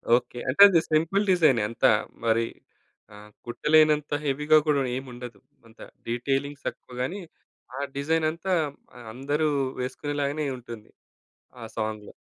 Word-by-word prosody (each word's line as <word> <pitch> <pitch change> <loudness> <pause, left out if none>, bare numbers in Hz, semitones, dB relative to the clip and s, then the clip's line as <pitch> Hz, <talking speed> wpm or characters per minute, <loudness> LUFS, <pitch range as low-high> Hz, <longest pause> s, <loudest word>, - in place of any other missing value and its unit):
Okay. 125 0 -3
అంటే 145 - +2
అది 175 -4 +4
simple 165 +6 +2
డిజైనే 155 -10 +4
అంతా 115 - +3 0.3
మరి 115 0 +2 0.7
ఆహ్, 105 +1 -13 0.2
కుట్టలేనంత 150 +4 +3
హెవీ‌గా 150 +2 +3
కూడా 145 -2 +3
ఏముండదు. 125 -2 -8 0.3
అంత 115 - -22 0.3
డీటెయిలింగ్ 135 +4 -2
తక్కువ 125 - -6
గాని, 175 +11 -3 0.6
ఆ - - -4 0.2
డిజైన్ 155 +3 0
అంతా 185 +3 -3 0.6
అందరూ 145 +4 -1 0.3
వేసుకునేలాగానే 145 +3 -3
ఉంటుంది, 115 -3 -11 0.7
ఆ - - -7
సాంగ్‌లో. 110 -1 -4
140 Hz, 115 wpm, -26 LUFS, 120-155 Hz, 0.7 s, అది